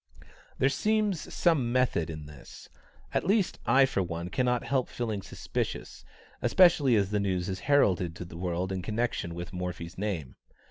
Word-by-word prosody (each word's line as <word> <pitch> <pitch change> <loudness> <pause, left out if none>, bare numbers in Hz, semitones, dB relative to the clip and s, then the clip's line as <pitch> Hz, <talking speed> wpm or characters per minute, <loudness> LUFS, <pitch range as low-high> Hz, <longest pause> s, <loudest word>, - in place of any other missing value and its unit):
There 135 - +3
seems 210 +3 0
some 145 -9 +2
"method" 125 -11 +1
in 75 -2 -6
this; 75 -1 -13 0.4
at - - +1
least 200 +1 +1
I 130 +3 +6
for 130 -7 -1
one 85 -1 -4
cannot 125 +4 +1
help 130 -2 0
feeling 110 -4 -3
suspicious, 95 - -4 0.4
especially 160 -9 +5
as 100 -2 +1
the 105 - +1
news 95 -3 -1
is 95 -1 -3
heralded 90 - +3
to 90 - -7
the 85 - -11
world 90 +1 -2
in 95 -1 -2
connection 105 -5 -2
with 85 +1 -6
Morphy's 90 -1 -5
name. 90 -11 -3
100 Hz, 165 wpm, -29 LUFS, 90-130 Hz, 0.4 s, I